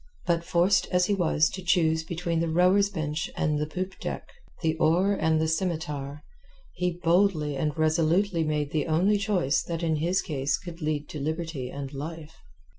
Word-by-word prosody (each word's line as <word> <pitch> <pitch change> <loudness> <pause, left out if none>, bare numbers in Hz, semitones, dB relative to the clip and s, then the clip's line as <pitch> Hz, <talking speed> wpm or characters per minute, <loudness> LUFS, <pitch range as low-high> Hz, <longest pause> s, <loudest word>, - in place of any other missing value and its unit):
But 170 -1 +1
forced 175 +3 +2
as 180 0 +2
he 205 - +1
was 160 -4 +2
to 190 - -6
choose 165 -3 +2
between 170 0 -2
the 165 0 0
rower's 185 +4 +4
bench 155 -4 -3
and 150 -1 +1
the 150 - -1
poop 185 +4 -5
deck, - - -5 0.4
the 160 -1 +1
oar 175 +6 +3
and 160 -4 +1
the 160 - +1
scimitar, 150 -4 -3 0.5
he 180 -1 -2
boldly 165 -4 +2
and 150 +2 -2
resolutely 165 +3 +2
made 150 -2 -1
the 155 -2 -1
only 185 +6 +2
choice 190 -9 +1
that 170 0 -4
in 160 -2 +1
his 175 +5 0
case 140 -4 -1
could 175 -1 -10
lead 150 -1 -2
to 150 - -6
liberty 155 -3 -3
and 140 +1 -6
life. 160 +2 -7
160 Hz, 180 wpm, -27 LUFS, 150-180 Hz, 0.5 s, rower's